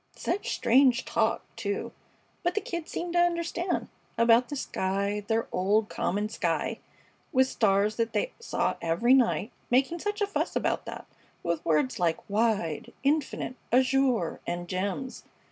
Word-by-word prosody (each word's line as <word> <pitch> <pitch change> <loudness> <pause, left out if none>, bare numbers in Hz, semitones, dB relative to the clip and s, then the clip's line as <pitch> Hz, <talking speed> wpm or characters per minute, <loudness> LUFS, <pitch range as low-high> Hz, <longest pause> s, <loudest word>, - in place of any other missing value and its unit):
Such 385 +4 -2
strange 250 0 +4
talk, 225 0 +1
too! 200 -3 -3 0.5
But 350 -1 0
the - - +3
Kid 340 -3 -5
seemed 345 0 -4
to 350 - +3
understand. 345 +1 0 0.3
About 230 +1 +5
the 290 - -3
sky 200 -4 -1
their 225 +1 +1
old, 205 +4 +2
common 205 +3 -1
sky, 220 - -1 0.5
with 260 0 +4
stars 210 -3 +2
that 230 -1 0
they - - -1
saw 465 - -1
every 170 +10 +3
night 245 -3 +3 0.2
making 270 +7 +2
such 415 +3 -2
a 410 - +2
fuss 405 - -2
about - - 0
that, - - -7 0.4
with 170 -1 -1
words 150 -5 +1
like 165 -2 0
"wide," 205 -7 0
"infinite," 285 -2 0 0.2
"azure," 255 -6 +2
and 175 0 -3
"gems." 200 +8 -3
230 Hz, 145 wpm, -28 LUFS, 200-275 Hz, 0.5 s, About